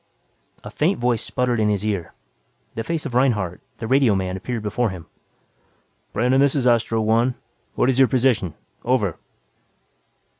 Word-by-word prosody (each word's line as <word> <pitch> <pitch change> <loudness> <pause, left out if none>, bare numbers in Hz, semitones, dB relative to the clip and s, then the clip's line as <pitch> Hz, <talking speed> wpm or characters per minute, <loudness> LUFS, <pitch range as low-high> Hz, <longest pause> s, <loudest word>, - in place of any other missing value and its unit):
A - - -8
faint - - +1
voice 120 -2 0
sputtered 125 -2 -1
in 105 -1 +2
his 105 0 -1
ear, 95 -6 -2 0.6
the 115 - -4
face 160 +5 -3
of 135 - -5
Reinhardt, 110 -9 +1 0.2
the 115 - -6
radioman 105 -8 +2
appeared 115 +3 -4
before 110 +3 0
him. 90 -4 -8 1.1
"Brandon, 125 +4 +2
this 140 0 +3
is 135 -3 0
Astro 115 -2 +2
One. 115 +3 +2 0.4
What - - +2
is 130 0 +2
your 135 - +6
position? 120 - +1 0.3
Over." 115 -8 0
120 Hz, 150 wpm, -22 LUFS, 105-125 Hz, 1.1 s, your